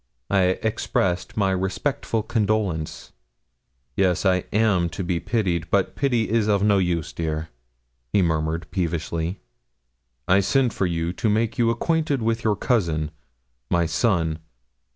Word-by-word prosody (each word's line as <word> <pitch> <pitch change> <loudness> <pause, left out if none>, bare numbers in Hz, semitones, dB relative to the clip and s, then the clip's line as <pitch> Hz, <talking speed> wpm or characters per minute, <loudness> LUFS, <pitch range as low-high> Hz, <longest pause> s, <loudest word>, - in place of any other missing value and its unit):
I 95 -2 +3
expressed 90 -4 -1
my 100 -2 +2
respectful 105 +5 -1
condolence. 105 -8 -1 0.8
'Yes; 95 -1 +1
I 90 -1 +2
am 100 -5 +2
to 85 +4 -5
be 85 -1 -1
pitied; 90 -7 -1
but 100 -1 +1
pity 120 -5 +1
is 110 -1 +1
of 100 -2 +2
no 100 -2 +4
use, 85 -4 -1
dear,' 80 -1 -3 0.6
he 95 - +3
murmured, 80 0 0
peevishly. 85 0 -2 0.9
'I 95 +2 +5
sent 120 +4 +2
for 95 - 0
you 85 0 -2
to 110 - 0
make 110 +3 0
you 115 -1 +4
acquainted 145 +1 0
with 115 +1 0
your 110 -2 +2
cousin, 85 -10 0 0.6
my 85 -1 +2
son. 80 -2 +1
95 Hz, 135 wpm, -24 LUFS, 85-110 Hz, 0.9 s, I